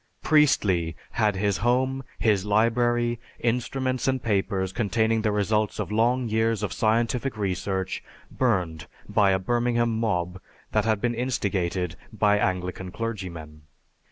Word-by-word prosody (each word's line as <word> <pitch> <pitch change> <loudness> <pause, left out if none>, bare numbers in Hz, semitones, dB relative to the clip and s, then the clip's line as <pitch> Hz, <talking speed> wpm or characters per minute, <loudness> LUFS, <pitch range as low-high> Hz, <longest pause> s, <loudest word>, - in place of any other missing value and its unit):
Priestley 95 - +3 0.2
had 105 -3 +1
his 100 0 0
home, 130 +2 +1
his 105 -4 +2
library, 120 +3 +2 0.2
instruments, 125 +2 -1
and 130 0 +2
papers 95 -3 0
containing 110 0 +1
the 110 -1 +1
results 105 +1 0
of - - -3
long 120 +3 +2
years 110 -1 +1
of 95 -6 -2
scientific 115 +4 0
research 95 -1 -2 0.3
burned 80 -3 0 0.2
by 105 -1 +3
a 95 - +3
Birmingham 120 +3 +1
mob 90 -5 -1 0.3
that 110 -1 +1
had 110 -2 +1
been 120 -1 +1
instigated 95 -8 -1
by 105 -2 +2
Anglican 90 -1 -2
clergymen. 90 -8 -6
110 Hz, 130 wpm, -25 LUFS, 95-120 Hz, 0.3 s, Priestley